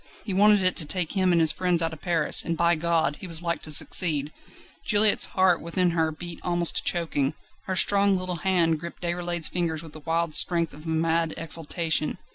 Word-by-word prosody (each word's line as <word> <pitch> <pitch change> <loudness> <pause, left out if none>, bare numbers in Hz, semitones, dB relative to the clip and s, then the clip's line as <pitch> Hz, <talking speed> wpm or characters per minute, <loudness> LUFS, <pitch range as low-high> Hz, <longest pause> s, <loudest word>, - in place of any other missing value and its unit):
He 200 - -4
wanted 205 +1 +3
it 185 0 +1
to 160 - +3
take 180 -1 0
him 185 -2 0
and 170 - +2
his 160 -2 +5
friends 180 -2 -1
out 165 -1 -1
of 160 - -12
Paris, 170 -4 +2
and, 165 -1 -4
by 170 +1 +2
God! 160 -3 -1
he 190 - -8
was 165 0 -3
like 170 -1 -3
to 155 - -8
succeed. 150 -1 +2 0.5
Juliette's 210 -1 +4
heart 185 -2 +2
within 175 +2 0
her 160 -1 -1
beat 170 +2 -8
almost 175 -1 +1
to - - -1
choking; 155 -4 -2 0.3
her 190 - -3
strong 200 +1 +2
little 180 -1 -4
hand 170 -4 0
gripped 170 +2 -10
Déroulède's 175 -1 -1
fingers 165 -3 -3
with 160 -2 -12
the 155 - -10
wild 165 +1 -2
strength 170 -1 +3
of 150 +2 -14
a - - -6
mad 165 0 -1
exultation. 160 0 -2
170 Hz, 210 wpm, -24 LUFS, 160-180 Hz, 0.5 s, his